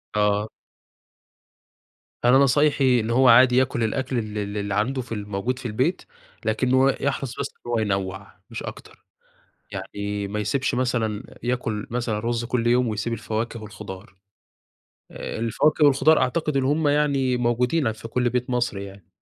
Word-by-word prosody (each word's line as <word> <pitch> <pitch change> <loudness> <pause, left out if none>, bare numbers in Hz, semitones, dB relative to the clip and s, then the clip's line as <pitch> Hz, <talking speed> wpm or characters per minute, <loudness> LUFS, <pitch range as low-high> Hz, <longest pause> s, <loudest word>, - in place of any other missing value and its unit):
آه. 105 0 +2 1.8
أنا 125 +2 +6
نصايحي 140 -2 +4
إن 110 +1 -2
هو 130 +2 +4
عادي 125 +1 +7
ياكُل 130 -2 +1
الأكل 130 +3 -1
ال 110 -2 -3
ال 100 0 -3
اللي 100 -1 -2
عنده 130 +6 0
في 125 - -14
ال 110 - -2
الموجود 105 +5 -3
في - - -11
البيت، 110 -3 0 0.4
لكنّه 130 +4 +3
يحرَص 135 -2 -2
بس - - -1 0.2
إن 120 - -5
هو 120 - +1
ينَّوع 95 -2 -2 0.2
مش - - -6
أكتر، - - -10 0.7
يعني 100 0 -4
ما 105 +2 -3
يسيبش 130 +6 0
مثلًا 120 -3 -2
ياكُل 120 -4 -2
مثلًا 120 -2 -1
رُز 115 +1 -2
كل 120 0 -1
يوم 120 +1 +3
ويسيب 110 +2 -2
الفواكه 115 +1 -3
والخضار، 95 -2 -9 1.0
آآ، - - -6
الفواكه 145 +7 +2
والخضار 145 +3 +5
أعتقد 150 +3 0
إن 135 - +1
هم 150 +3 +1
يعني 140 -4 +2
موجودين 125 +3 +1
في 110 +1 -9
كل 125 +1 0
بيت 125 +1 -2
مصري 120 -5 -1
يعني، 95 -3 -13
120 Hz, 155 wpm, -24 LUFS, 105-130 Hz, 1.8 s, عادي